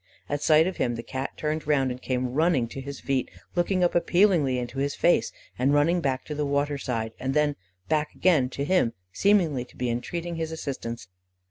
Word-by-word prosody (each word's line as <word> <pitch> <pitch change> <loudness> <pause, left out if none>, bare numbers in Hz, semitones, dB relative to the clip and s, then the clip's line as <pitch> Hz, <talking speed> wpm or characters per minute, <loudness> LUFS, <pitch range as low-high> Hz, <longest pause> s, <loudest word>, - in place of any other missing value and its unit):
At 145 0 -2
sight 155 0 +5
of 185 - -3
him, 120 - 0
the 115 - -6
Cat 135 +2 -5
turned 155 0 -2
round, 135 -4 +2
and 125 +1 -7
came 125 -1 -2
running 155 -5 +2
to 135 - -6
his 140 0 -7
feet, 135 -2 -1 0.2
looking 180 +1 +1
up 175 - +2
appealingly 175 -7 +3
into 125 +2 -4
his 140 +1 -1
face, 175 - +3 0.3
and 135 +3 +3
running 165 +4 +3
back 130 -4 -1
to 150 - -5
the 150 0 -1
water 145 0 0
side 115 -4 -2
and 135 +2 -2
then 150 -1 +2 0.3
back 155 -1 0
again 155 -9 +3
to 140 +2 -3
him, 155 -9 +2 0.2
seemingly 175 -11 +3
to - - -20
be 125 -1 -1
entreating 170 +8 -4
his 160 -1 -3
assistance. 130 - -5
145 Hz, 205 wpm, -26 LUFS, 130-165 Hz, 0.3 s, sight